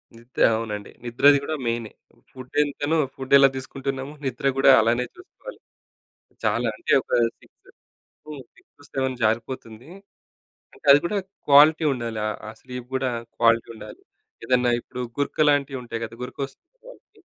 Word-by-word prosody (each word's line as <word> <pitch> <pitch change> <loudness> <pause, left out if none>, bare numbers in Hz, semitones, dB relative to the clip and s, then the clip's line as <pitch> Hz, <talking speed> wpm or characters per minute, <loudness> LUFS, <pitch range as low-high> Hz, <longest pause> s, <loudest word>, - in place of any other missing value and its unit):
నిద్ర 120 +2 -8 0.2
అవునండి. 105 -3 -6
నిద్రది 140 +4 +5
గూడా 155 +2 -3
మెయినే. 115 -2 -3 0.4
ఫుడ్ 130 -1 -12
ఎంతనో, 145 +2 -1 0.2
ఫుడ్ 130 0 -4
ఎలా 135 0 +7
తీసుకుంటున్నామో, 135 +1 -5
నిద్ర 135 +2 -2
గూడా 135 0 +6
అలానే 120 +3 +1
చూసుకోవాలి. 375 +7 -13 0.9
చాలా - - +1
అంటే 345 - -2
ఒక - - -13 0.3
6 - - -25 0.6
హ్మ్. 145 -3 -8
6,7 130 -3 -6
జారిపోతుంది. 115 +2 -3 0.9
అంటే - - -17
అది 145 - +7
గూడా 200 +4 -1 0.3
క్వాలిటీ 155 +3 +6
ఉండాలి. 115 -3 -4
ఆహ్, 105 - -4
ఆ - - -6
స్లీప్ 125 -1 -8
గూడా 130 -1 0 0.3
క్వాలిటీ 115 0 +3
ఉండాలి. - - -11 0.4
ఏదన్నా 125 0 +2
ఇప్పుడు 125 - -9 0.2
గురక 145 +1 +1
లాంటివుంటాయి 135 -5 -1
గదా! 115 0 -6
గురక 125 +2 -8
వస్తున్న 135 - -13 0.2
వాళ్ళకి, - - -18
130 Hz, 140 wpm, -23 LUFS, 120-145 Hz, 0.9 s, ఎలా